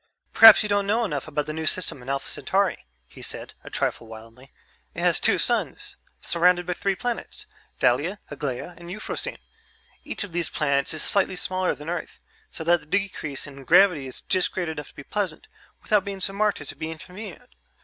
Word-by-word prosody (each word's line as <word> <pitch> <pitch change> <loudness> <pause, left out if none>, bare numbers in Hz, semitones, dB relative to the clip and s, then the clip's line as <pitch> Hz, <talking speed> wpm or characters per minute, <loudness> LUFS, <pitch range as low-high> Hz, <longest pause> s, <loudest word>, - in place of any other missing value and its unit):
"Perhaps 225 -1 +10
you - - -1
don't 200 -1 +1
know 225 +3 +2
enough 145 -8 -3
about 150 -1 -2
the 155 - -4
new 160 0 -3
system 165 -7 0
in 125 - -9
Alpha 135 0 -2
Centauri," 195 - -1 0.2
he - - -14
said, - - -5
a - - -9
trifle 115 - -2
wildly. 115 +4 -13 0.4
"It - - -4
has - - +4
two - - +3
suns - - -1 0.2
surrounded 175 +1 +3
by 180 - -1
three 195 +2 -1
planets, 240 +5 -4 0.3
Thalia, 150 +12 +2
Aglaia, 140 +4 -4
and 170 0 -11
Euphrosyne. 210 +4 -4 0.7
Each - - -4
of 205 - -8
these 170 -1 0
planets 140 0 0
is 155 - -1
slightly 190 -1 +1
smaller 185 0 0
than 150 - -11
Earth, 175 0 -4 0.3
so 160 - -6
that 170 +1 +4
the - - -19
decrease 180 -6 -2
in 140 -1 -11
gravity 160 -3 +5
is 130 - -6
just 185 -1 +1
great 180 -3 -2
enough 150 -2 -5
to - - -18
be 145 - -9
pleasant, 190 -1 -3 0.4
without 210 -2 +3
being 195 0 -5
so 195 +1 -2
marked 210 -4 +1
as 145 - -8
to - - -6
be 155 +2 -5
inconvenient. 190 +9 -9
175 Hz, 200 wpm, -25 LUFS, 145-195 Hz, 0.7 s, Perhaps